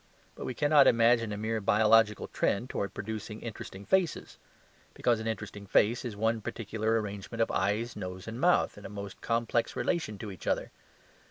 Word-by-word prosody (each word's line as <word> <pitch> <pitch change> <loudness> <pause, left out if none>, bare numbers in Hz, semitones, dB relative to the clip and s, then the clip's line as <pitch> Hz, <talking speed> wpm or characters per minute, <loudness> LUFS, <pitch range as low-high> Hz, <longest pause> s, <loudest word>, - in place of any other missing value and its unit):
But - - -7
we 130 - -4
cannot 145 -2 +5
imagine 115 -1 +4
a 105 - -3
mere 110 +1 -2
biological 110 +1 +4
trend 120 +6 -1
towards 100 - -2
producing 110 +1 -5
interesting 100 -3 -8
faces; 190 -4 0 0.6
because 120 -2 +2
an 110 - -4
interesting 105 -2 -5
face 110 +5 +3
is 120 -4 -5
one 110 +2 0
particular 110 +1 -1
arrangement 105 +2 -6
of 115 - +2
eyes, 110 +4 0
nose, 90 -1 -6
and 115 +2 -5
mouth, 175 -10 +3
in 105 - -13
a - - -11
most 100 -1 -8
complex 115 0 0
relation 155 - -1
to 105 +1 -6
each 95 - -11
other. - - 0
110 Hz, 175 wpm, -30 LUFS, 105-115 Hz, 0.6 s, cannot